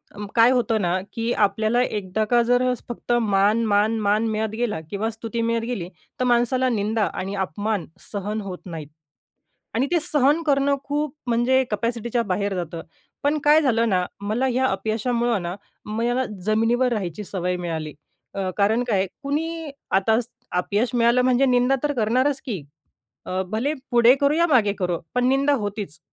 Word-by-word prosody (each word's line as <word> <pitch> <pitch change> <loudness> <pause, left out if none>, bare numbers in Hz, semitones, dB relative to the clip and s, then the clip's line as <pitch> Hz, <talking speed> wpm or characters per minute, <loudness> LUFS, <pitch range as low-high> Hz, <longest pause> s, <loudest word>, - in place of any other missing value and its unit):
अं, 205 - -6
काय 230 +1 +6
होतं 235 -4 +1
ना 180 +1 +1
की 230 +1 -2
आपल्याला 215 +4 +2
एकदा 210 -2 -2
का 240 - +5
जर 245 +1 +2 0.2
फक्त 240 0 -5
मान, 210 +1 +2
मान, 215 +1 +2
मान 210 +2 +2
मिळत 220 0 -1
गेला 230 -6 -1
किंवा 210 +2 -2
स्तुती 225 +1 -4
मिळत 230 0 0
गेली 215 -8 -4 0.3
तर 255 - +1
माणसाला 245 +1 +2
निंदा 215 -1 0
आणि 195 +2 -4
अपमान 200 +1 -2 0.3
सहन 210 +1 -3
होत 190 -3 -6
नाहीत. 160 -5 -7 0.9
आणि 255 +4 +2
ते 350 - +3
सहन 295 +3 +2
करणं 280 -2 +2
खूप 290 0 -2
म्हणजे 245 +2 +3
कॅपॅसिटीच्या 235 +2 -1
बाहेर 200 +2 0
जातं. 170 -2 -4 0.4
पण 290 +2 +2
काय 300 +1 +6
झालं 235 -5 +2
ना, 185 -3 +2 0.2
मला 215 +6 0
ह्या 260 +1 +1
अपयशामुळं 235 -2 0
ना 175 +1 -3 0.3
मला 240 +4 0 0.2
जमिनीवर 235 +3 +2
राहायची 200 -1 -3
सवय 180 -1 -2
मिळाली. 160 -4 -4 0.4
अ, 195 -1 -2
कारण 215 +4 +2
काय 195 -3 +2 0.2
कुणी 320 +2 -3 0.3
आता 220 +4 +3 0.4
अपयश 205 +6 0
मिळालं 240 +1 +4
म्हणजे 255 +1 +3
निंदा 250 +1 +3
तर 295 -1 +1
करणारच 255 +4 +1
की. 210 -9 -3 0.7
अ, 185 +1 -1
भले 235 +7 0 0.2
पुढे 240 0 +6
करो, 285 +1 +3
या 340 +2 +3
मागे 235 -10 +3
करो 180 -3 -1
पण 250 0 +2
निंदा 275 +2 +3
होतीच. 205 -6 -5
230 Hz, 165 wpm, -23 LUFS, 205-250 Hz, 0.9 s, काय